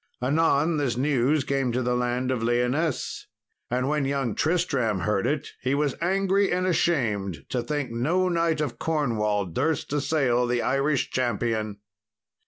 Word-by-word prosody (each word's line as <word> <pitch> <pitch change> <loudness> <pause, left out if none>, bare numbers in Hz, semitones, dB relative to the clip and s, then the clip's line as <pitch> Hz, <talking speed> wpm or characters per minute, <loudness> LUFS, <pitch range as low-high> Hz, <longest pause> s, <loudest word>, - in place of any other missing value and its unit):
Anon 155 +3 +2
this 130 -5 -1
news 140 +1 +2
came 135 -2 0
to 125 +1 0
the 125 +1 0
land 125 +1 0
of 125 -3 -1
Lyonesse, 125 +6 -1 0.4
and 125 +2 0
when 150 0 +1
young 135 -4 -1
Tristram 140 - 0
heard 100 +2 0
it 145 -1 -1
he 130 +2 0
was 145 -2 +1
angry 195 +2 +2
and 180 +1 +1
ashamed 110 - 0
to 125 - -1
think 145 -2 -3
no 160 +11 +1
knight 165 -3 +1
of 120 -6 -3
Cornwall 110 -10 0
durst 145 - -1
assail 135 -4 +1
the 120 0 0
Irish 135 0 +1
champion. 110 -3 -1
135 Hz, 150 wpm, -25 LUFS, 120-155 Hz, 0.4 s, Anon